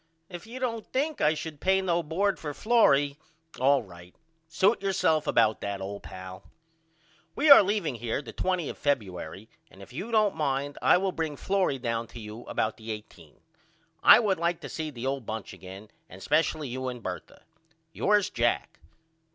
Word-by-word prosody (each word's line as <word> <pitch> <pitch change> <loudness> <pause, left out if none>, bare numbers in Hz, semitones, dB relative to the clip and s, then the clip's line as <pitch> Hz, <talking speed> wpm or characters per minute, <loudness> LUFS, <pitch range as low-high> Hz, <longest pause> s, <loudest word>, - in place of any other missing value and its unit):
If 175 +2 -9
you 240 +3 -8
don't 230 -4 -2
think 295 +3 -2
I 155 +1 +3
should 155 -1 -7
pay 190 0 +3
no 175 -2 +1
bord 185 +6 -1
for 150 -2 -5
Florrie 145 -11 +3 0.4
all 135 0 +3
right. 90 -2 -14 0.3
Suit 190 +7 +2
yourself 160 -5 +1
about 110 - +3
that 100 -1 -3
old 100 +1 -6
pal. 95 0 -9 0.9
We 295 +1 +4
are 280 - +12
leaving 195 -7 -1
here 115 0 -3
the - - -10
20 185 -4 -1
of - - -7
Febuery 105 -6 -2 0.2
and 95 - -18
if 100 - -13
you 195 - -5
don't 215 -3 +3
mind 145 -2 -2
I - - +5
will 190 +1 0
bring 160 -4 -3
Florrie 190 -8 0
down 115 -2 -3
to 120 - -11
you 110 +2 -9
about 110 - -2
the 110 0 -10
18. 105 -8 -9 0.6
I - - +9
would 200 -6 +1
like 170 0 0
to - - -7
see 160 -1 -4
the 125 -3 -7
old 135 -3 -3
bunch 110 -2 -5
again 95 +3 -11 0.2
and 95 +1 -12
spesially 155 0 +1
you 130 +1 -4
and 125 -3 -6
Bertha. 90 -1 -7 0.5
Yours, 205 -1 +2
JACK. 115 - -1
145 Hz, 180 wpm, -27 LUFS, 110-190 Hz, 0.9 s, are